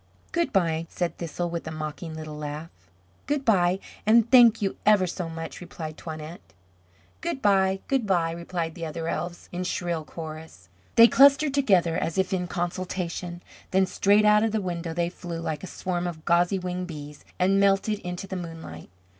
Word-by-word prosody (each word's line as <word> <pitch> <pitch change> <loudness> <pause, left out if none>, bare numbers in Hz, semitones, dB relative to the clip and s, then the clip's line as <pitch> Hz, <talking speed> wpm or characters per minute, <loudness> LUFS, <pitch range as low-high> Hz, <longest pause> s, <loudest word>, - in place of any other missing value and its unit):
"Good 340 0 0
bye," 165 -4 +1
said 175 -2 -3
Thistle, 170 +1 -3
with 170 -1 -4
a - - -4
mocking 155 +1 -5
little 155 -1 -7
laugh. 150 +2 -6 0.6
"Good 285 -1 -1
bye, 185 -5 +3 0.3
and 230 +2 +4
thank 235 -3 +7
you 195 -2 -2
ever 210 -3 +5
so 175 -1 -4
much," 165 +1 -7
replied 160 -3 -7
Toinette. 155 +1 -8 0.8
"Good 335 -4 -2
bye, 195 -3 +3
good 265 -6 0
bye," 170 -4 +2
replied 170 -1 -4
the 170 - -8
other 160 +1 -4
elves, 175 +2 -4
in 180 +1 -3
shrill 175 -3 -2
chorus. 155 - -9 0.3
They 230 0 +9
clustered 280 +2 +5
together, 190 -12 +3
as 165 - -2
if 190 0 +1
in 180 -1 -1
consultation; 175 -1 -4 0.3
then 190 0 +3
straight 205 +3 +3
out 210 0 +6
of 220 -1 0
the 220 - +1
window 175 -3 -3
they 170 0 0
flew 175 -2 -7
like 155 -3 -4
a - - -5
swarm 180 -1 -3
of 160 -3 -7
gauzy 175 +2 +3
winged 180 0 -4
bees, 150 -3 -9
and 190 +2 +3
melted 200 +1 +2
into 180 -1 -5
the 190 - -6
moonlight. 165 - -8
175 Hz, 180 wpm, -26 LUFS, 165-195 Hz, 0.8 s, They